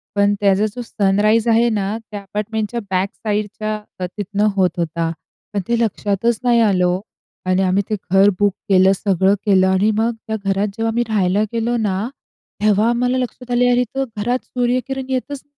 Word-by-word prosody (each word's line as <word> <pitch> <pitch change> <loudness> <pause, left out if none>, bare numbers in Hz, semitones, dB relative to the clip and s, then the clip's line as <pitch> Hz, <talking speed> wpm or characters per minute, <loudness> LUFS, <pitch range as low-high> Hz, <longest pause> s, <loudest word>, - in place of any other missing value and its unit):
पण 200 0 +3
त्याचा 200 +1 +3
जो 245 - -4
सनराईज 215 +1 +2
आहे 230 +1 +4
ना, 210 -1 -1
त्या 205 -1 -5
अपार्टमेंटच्या 210 +3 -3
बॅक 190 +1 0
साइडच्या 215 0 -3 0.3
तिथनं 205 +2 -1
होत 185 -2 +3
होता. 165 0 -1 0.4
पण 200 - 0
ते 235 0 +1
लक्षातच 215 0 0
नाही 240 -1 +4
आलं 195 -5 +3
हो 180 +1 0 0.4
आणि 185 +1 +2
आम्ही 190 +2 +2
ते 215 - +1 0.2
घर 195 +1 +6
बुक 205 -2 +3 0.2
केलं, 190 0 +5
सगळं 190 0 +2
केलं 190 -2 +4
आणि 190 +3 +3
मग 225 +2 +2 0.2
त्या 220 - -1
घरात 195 +1 +1
जेव्हा 225 0 0
मी 240 - +2
राहायला 200 -1 +2
गेलो 230 +1 0
ना, 205 -1 -1 0.6
तेव्हा 215 +1 +3
आम्हाला 245 +2 +1
लक्षात 250 0 -5
आलं 245 0 +3
अरे 245 0 +3
तर 270 - +1
घरात 240 +5 0
सूर्यकिरण 255 +2 -1
येतच 265 +2 -3
210 Hz, 175 wpm, -19 LUFS, 195-235 Hz, 0.6 s, घर